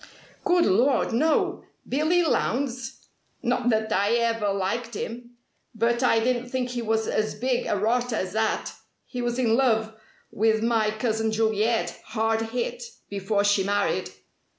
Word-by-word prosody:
"Good 355 -3 +3
lord, 240 +5 +2
no! 310 +7 +1 0.2
Billy 310 +6 +2
Lowndes! 255 -5 -1 0.4
Not 245 0 +1
that 220 -1 +1
I 205 +3 +2
ever 230 -3 +1
liked 205 +4 -2
him. 240 +3 -6 0.4
But 235 +2 +1
I 250 -3 +4
didn't 245 +1 0
think 255 0 -2
he 245 -1 -3
was 220 0 0
as 215 0 -1
big 250 +2 -1
a 205 - 0
rotter 240 +3 0
as 185 -3 -3
that! 220 0 -1 0.3
He 250 - -5
was 240 0 -1
in 235 -3 +2
love 225 -4 +2 0.4
with 220 +1 +2
my 225 -2 +2
cousin 220 0 -1
Juliet, 220 +1 0
hard 225 0 0
hit, 245 +1 -3 0.3
before 200 +1 0
she 205 -1 +3
married. 205 +1 0
230 Hz, 150 wpm, -25 LUFS, 215-245 Hz, 0.4 s, I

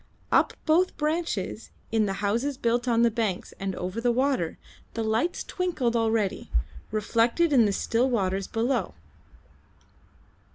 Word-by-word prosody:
Up - - +4
both 345 +4 +3
branches, 320 +3 -2 0.2
in 220 -2 +2
the 195 - -1
houses 245 +7 0
built 240 +1 0
on 235 -1 +3
the 235 - +4
banks 215 -5 -2
and 195 -1 -3
over 185 +5 -4
the 240 0 +3
water, 255 - 0 0.4
the 225 - -1
lights 225 +10 0
twinkled 320 -10 -1
already, 225 -3 0 0.4
reflected 230 +9 +2
in 240 -5 +6
the 205 - +2
still 235 +5 +1
waters 195 -5 0
below. 235 +4 -1
230 Hz, 135 wpm, -27 LUFS, 215-265 Hz, 0.4 s, in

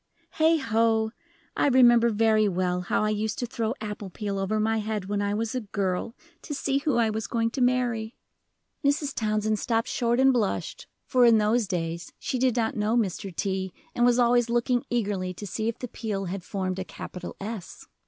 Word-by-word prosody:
Heigho! 230 -8 +3 0.4
I - - +2
remember 240 -3 +6
very 215 -1 +3
well 180 -1 0
how 180 - 0
I 215 - +1
used 215 +1 -2
to 245 - -2
throw 230 -2 -2
apple 210 -2 -5
peel 200 +1 -4
over 205 +3 0
my 220 +1 +1
head 210 -2 -3
when 205 +1 -1
I 205 0 0
was 220 +1 -2
a 255 - -1
girl 200 +1 -2 0.3
to 295 - -5
see 275 0 0
who 280 -2 0
I 225 -2 +3
was 220 +1 -3
going 230 -1 0
to 260 - -3
marry." 245 -3 +1 0.7
Mrs. 285 0 +1
Townsend 215 -1 0
stopped 230 -2 0
short 240 0 0
and 265 0 +5
blushed, 220 -6 -2 0.2
for 255 -2 +3
in 230 -2 +7
those 215 +1 +2
days 170 -1 -3
she 255 - -3
did 255 -2 +2
not 225 -2 0
know 215 +2 +1
Mr. 195 -3 -1
T., 190 -1 -2 0.2
and 240 - +1
was 245 0 +5
always 240 -1 +3
looking 240 +1 +1
eagerly 200 -6 -1
to 205 - -7
see 215 +3 -3
if 230 - -2
the 250 - -5
peel 210 -4 -4
had 185 0 -4
formed 185 -1 -3
a - - -2
capital 180 -1 -8
S. 205 -2 -7
220 Hz, 195 wpm, -26 LUFS, 200-240 Hz, 0.7 s, in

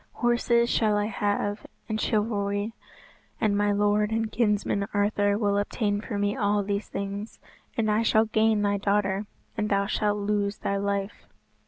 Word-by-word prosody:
Horses 240 0 +2
shall 215 -3 +2
I 205 - +1
have, 205 0 -2 0.2
and 220 -1 -2
chivalry; 205 -1 0 0.7
and 215 -2 +2
my 205 0 +2
lord 205 +1 +2
and 225 0 -1
kinsman 210 -3 +1
Arthur 205 0 +2
will 205 -2 +1
obtain 205 0 -1
for 220 -2 -4
me 205 0 0
all 205 0 +1
these 200 +1 -3
things. 200 +2 -5 0.4
And 220 -2 +2
I 210 +1 +2
shall 220 -1 +3
gain 220 -1 +2
thy 205 0 +1
daughter, 200 0 0 0.3
and 210 0 -1
thou 200 0 +2
shalt 210 +1 0
lose 205 0 -1
thy 200 - -2
life." 200 0 -3
205 Hz, 160 wpm, -26 LUFS, 200-215 Hz, 0.7 s, shall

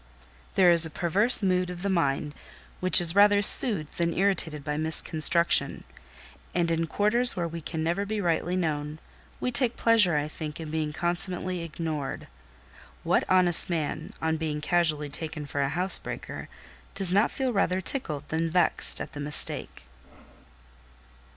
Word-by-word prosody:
There 180 -2 +4
is 170 -1 +4
a 160 - +5
perverse 200 +9 +3
mood 185 -1 0
of 180 0 -8
the - - -2
mind 150 -4 -1 0.5
which 185 0 +5
is 170 -2 +4
rather 205 +1 +4
soothed 200 - +5
than 170 0 -2
irritated 170 -6 -2
by 150 +1 -4
misconstruction; 160 +2 +1 0.7
and 170 -2 0
in 165 0 -1
quarters 235 +7 +1
where 175 -2 -3
we 165 0 -8
can 160 0 -5
never 170 +5 -2
be 210 +1 -4
rightly 175 -1 -2
known, 150 -4 -3 0.4
we 250 - -3
take 250 -2 0
pleasure, 215 -9 +3
I 145 0 -2
think, 155 0 -8
in 160 -2 -8
being 155 -1 -3
consummately 175 +2 -3
ignored. 155 -4 -6 0.8
What - - 0
honest 180 -2 +6
man, 160 -4 -4
on 160 0 -2
being 155 -2 -4
casually 155 -2 0
taken 155 0 -6
for 140 0 -4
a 140 - -1
housebreaker, 180 +6 -1 0.5
does 190 -2 +3
not 205 +3 +2
feel 260 -2 -3
rather 190 -2 0
tickled 155 - -4
than 165 +1 -2
vexed 175 +1 0
at - - -8
the 145 - -9
mistake? 145 - -2
170 Hz, 155 wpm, -25 LUFS, 155-185 Hz, 0.8 s, honest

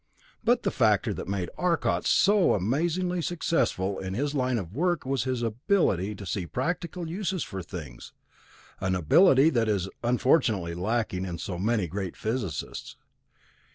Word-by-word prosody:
But - - +3
the - - +1
factor - - +2
that - - -6
made 95 -2 -2
Arcot 175 -2 +1
so 200 -2 +4
amazingly 170 - 0
successful 155 - 0
in 95 0 -4
his 140 +5 -1
line 130 -3 +1
of 95 -4 -5
work 175 +3 0
was 135 -2 -1
his 130 -2 -1
ability 115 - +1
to 100 - -9
see 90 -1 -3
practical 170 - -3
uses 185 +1 -2
for 95 -1 -6
things, 80 -9 -9 0.7
an 95 -1 0
ability 135 - +5
that 115 -5 +1
is 95 -3 0
unfortunately 120 - +2
lacking 95 +1 -1
in 90 -3 -4
so 90 +1 -5
many 105 0 +1
great 95 +1 -5
physicists. 110 - -4
115 Hz, 150 wpm, -27 LUFS, -, 0.7 s, ability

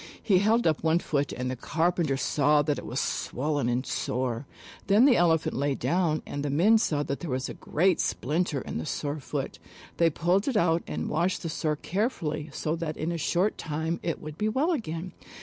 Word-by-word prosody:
He 190 -4 +4
held 220 +4 +3
up 155 -2 +2
one 160 +1 +4
foot 145 -4 -1
and 125 +1 -3
the - - -3
carpenters 160 0 0
saw 150 0 +3
that 145 -1 0
it - - -9
was - - -2
swollen 145 -1 -1
and 125 +2 0
sore. 125 +1 -2 0.4
Then 205 +5 +6
the 270 -4 +6
Elephant 165 -2 +2
lay 140 0 0
down 170 -2 0
and 145 - -4
the 145 - -1
men 195 +11 +4
saw 150 -8 0
that 140 -1 -3
there 170 - -5
was 130 0 -1
a - - -5
great 180 +3 +1
splinter 150 -1 0
in - - -5
the 80 - -4
sore 145 +1 -3
foot. 135 - -4 0.4
They 170 -1 +4
pulled 175 - +1
it 260 -5 +1
out 170 -2 +3
and 80 0 -3
washed 170 +6 0
the 165 - -2
sore 155 -1 -1
carefully 170 - -2
so 155 +2 -2
that 160 -2 -4
in 160 +2 -2
a 170 - -2
short 180 +6 +1
time 160 +2 -2
it 165 -2 -2
would 155 0 -9
be 215 - +1
well 275 +10 +1
again. 180 - -3
160 Hz, 210 wpm, -27 LUFS, 145-180 Hz, 0.4 s, Then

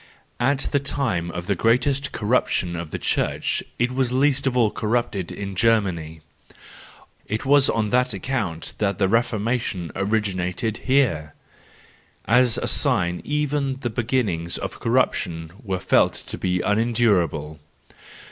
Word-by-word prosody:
'—At 135 +3 +2
the 145 - +2
time 130 -12 -1
of 85 0 -5
the 100 - +1
great 135 +8 +1
corruption 105 -5 0
of 85 -2 -5
the - - -4
church - - 0 0.2
it 120 +1 +1
was 130 -1 0
least 135 +1 +2
of 125 -1 0
all 115 -4 +3
corrupt 115 0 -1
in 100 +1 -5
Germany: 95 -7 +1 1.1
it 110 +5 -3
was 140 0 +5
on 110 -2 0
that 125 +1 +2
account 100 -6 -3
that 100 -3 0
the 95 - +2
Reformation 110 -4 0
originated 100 0 -1
here, 125 - +1 0.9
as 125 0 +4
a - - -2
sign 90 -1 +1
that - - -13
even 145 -2 0
the 120 - -2
beginnings 110 -9 -1
of - - -6
corruption 80 -1 0
were 95 -4 -2
felt - - +3
to - - -7
be 90 -1 -1
unendurable. 100 -9 +1
110 Hz, 140 wpm, -23 LUFS, 90-125 Hz, 1.1 s, was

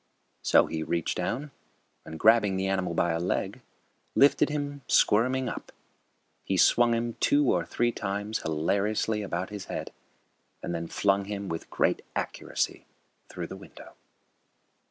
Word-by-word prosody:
So - - +5
he 80 -1 -4
reached 85 +1 -1
down 125 +11 -3 0.6
and, 80 0 -7
grabbing 110 -4 +5
the 95 - -1
animal 95 -3 -1
by 85 - +2
a 80 - -1
leg, 90 +2 -2 0.5
lifted 140 +2 +5
him, 145 -1 -3
squirming, 130 +5 +3
up. - - -6 0.7
He 95 - -1
swung 120 +5 +5
him 115 0 -2
two 145 -2 +3
or 85 -2 0
three 120 0 +1
times 105 +1 -3
hilariously 100 +7 0
about 95 -1 -3
his 105 -2 -6
head, - - -5 0.7
and 85 - -3
then 85 0 -3
flung 100 +2 +1
him 100 -1 -5
with 80 0 -5
great - - +1
accuracy - - -3 0.4
through - - -5
the - - -8
window. - - -13
100 Hz, 145 wpm, -28 LUFS, 85-115 Hz, 0.7 s, So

